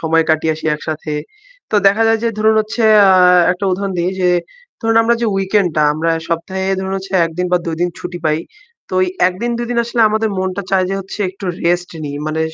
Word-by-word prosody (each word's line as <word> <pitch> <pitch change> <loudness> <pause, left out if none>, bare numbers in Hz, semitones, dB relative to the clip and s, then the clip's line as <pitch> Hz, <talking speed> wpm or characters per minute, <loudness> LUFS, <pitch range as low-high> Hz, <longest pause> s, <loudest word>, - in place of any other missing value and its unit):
সময় 165 0 +2
কাটিয়ে 160 0 +1
আসি 155 - -11
একসাথে। 155 0 -5 0.6
তো - - -3
দেখা 205 +3 +4
যায় 225 0 +3
যে - - +2
ধরুন, 220 +1 +3
হচ্ছে, 220 +2 -3 0.3
আ - - +6 0.4
একটা 185 +2 -5
উদাহরণ 195 +1 -2
দিই 175 +2 0
যে 180 - +3 0.5
ধরুন, 225 -1 +1
আমরা 235 +1 +3
যে 235 - +1
weekend 195 0 +1
টা 155 - +3
আমরা 165 +2 -1 0.2
সপ্তাহে 180 +3 -3
ধরুন, 190 0 -3
হচ্ছে 195 0 -8
১ 165 - -3
দিন 180 - 0
বা - - +5
২ 165 - -2
দিন 175 - +2
ছুটি 175 0 -6
পাই। 155 0 +1 0.5
তো - - -4
ঐ - - +4 0.2
১ 185 - -7
দিন 240 - 0
২ 240 - -3
দিন 235 - 0
আসলে 235 0 -2
আমাদের 220 +1 0
মনটা 185 +1 -2
চায় 190 -1 +2
যে - - -1
হচ্ছে 190 +2 -9
একটু 195 +1 -11 0.2
rest 175 +1 0
নিই। 145 -1 -5
মানে 155 +1 -2
185 Hz, 225 wpm, -16 LUFS, 165-215 Hz, 0.6 s, আ